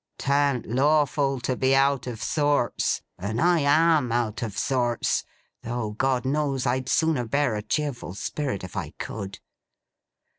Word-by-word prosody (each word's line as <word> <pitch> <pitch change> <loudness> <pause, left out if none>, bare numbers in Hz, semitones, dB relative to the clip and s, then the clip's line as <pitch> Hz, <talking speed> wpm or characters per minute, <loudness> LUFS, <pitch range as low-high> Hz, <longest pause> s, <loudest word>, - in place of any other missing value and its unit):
'Tan't 140 -2 +1
lawful 140 +1 +2
to 130 +1 -1
be 130 +2 +2
out 135 -1 +2
of 115 -3 -5
sorts, 145 -5 +1 0.2
and 105 +5 -3
I 175 +3 +4
AM 150 -2 +3
out 115 -2 -1
of 110 -4 -4
sorts, 120 -3 0 0.4
though 115 -2 -3
God 130 +3 0
knows 140 -1 0
I'd 130 +1 0
sooner 155 -7 +1
bear 140 0 +1
a 105 - -2
cheerful 135 - -3
spirit 130 -2 -3
if 90 - -8
I - - -4
could. 100 -2 -6
130 Hz, 145 wpm, -25 LUFS, 120-145 Hz, 0.4 s, I